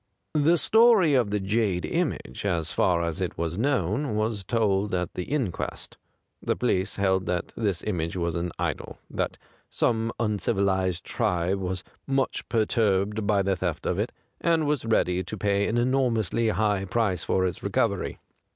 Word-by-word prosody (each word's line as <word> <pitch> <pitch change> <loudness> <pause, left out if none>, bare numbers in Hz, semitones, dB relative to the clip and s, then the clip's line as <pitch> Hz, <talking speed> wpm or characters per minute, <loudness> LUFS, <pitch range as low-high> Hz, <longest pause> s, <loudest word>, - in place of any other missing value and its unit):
The 155 +3 +4
story 220 -5 +5
of 125 -6 +3
the 105 0 0
jade 100 -2 0
image, 65 - -2
as 85 -5 0
far 85 -2 +2
as 85 +2 -3
it 90 - -2
was 85 +3 -2
known, 125 - 0
was 110 -1 -1
told 100 -2 +1
at 90 -1 -2
the 90 - -4
inquest. 130 - -3 0.5
The - - 0
police 95 +2 0
held 95 -1 +1
that 90 -1 -2
this 100 -6 -1
image 85 -4 -2
was 85 -2 -1
an 85 +1 -2
idol, - - -3
that - - -2 0.3
some 115 -1 +1
un 105 -3 0
civilized 95 -2 0
tribe 90 +2 0
was 95 0 -3 0.2
much 135 -1 -1
perturbed 105 -2 +1
by 100 -2 +3
the 95 0 +1
theft 90 -3 -3
of - - 0
it, - - -1 0.3
and 165 -2 +2
was 145 -5 0
ready 95 -5 +2
to 110 +5 -6
pay 100 0 +1
an 115 - 0
enormously 120 -3 +1
high 105 -3 +1
price 100 -2 0
for 95 - +1
its 90 - -3
recovery. - - 0
100 Hz, 165 wpm, -26 LUFS, 90-115 Hz, 0.5 s, story